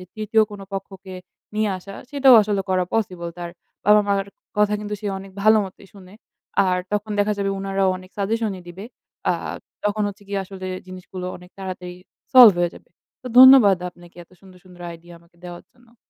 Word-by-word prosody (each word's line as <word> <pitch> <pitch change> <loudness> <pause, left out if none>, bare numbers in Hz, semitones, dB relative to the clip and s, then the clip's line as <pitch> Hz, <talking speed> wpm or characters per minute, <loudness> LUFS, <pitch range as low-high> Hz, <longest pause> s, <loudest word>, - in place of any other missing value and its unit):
যে - - -10
৩য়, 215 +1 +2
কোন 205 -1 -9
পক্ষকে 195 -1 -7 0.4
নিয়ে 215 0 +1
আসা 195 +2 -11 0.2
সেটাও 275 -3 +6
আসলে 205 -1 -1
করা 185 -1 +2
পসিবল। 180 -6 -2
তার 175 -1 -6 0.4
বাবা-মার 205 -2 +4 0.3
কথা 210 0 +3
কিন্তু 210 0 -5
সে 210 - -6
অনেক 195 0 -11
ভালোমতই 205 -2 +2
শুনে। 190 -1 -15 0.5
আর 180 -1 +1 0.2
তখন 210 +1 -2
দেখা 205 +1 +2
যাবে 200 0 -1
উনারাও 195 0 0
অনেক 185 0 -14
সাজেশনই 205 -2 -2
দিবে। 185 +4 -9 0.5
আ - - +3 0.5
তখন 210 +1 0
হচ্ছে 205 +1 -10
কি 200 - -5
আসলে 190 0 -9 0.2
জিনিসগুলো 185 0 -8
অনেক 180 0 -16
তাড়াতাড়ি 185 -2 -7 0.4
solve 240 -6 +10
হয়ে 175 -1 +1
যাবে। - - -16 0.3
তো - - -10
ধন্যবাদ 255 -7 +9
আপনাকে 175 0 -19
এত - - -44
সুন্দর, 185 -2 -17
সুন্দর 180 -1 -14
আইডিয়া 170 +1 -12
আমাকে 170 0 -27
দেওয়ার 175 -1 -9
জন্য। 245 -1 -26
195 Hz, 175 wpm, -22 LUFS, 185-210 Hz, 0.5 s, solve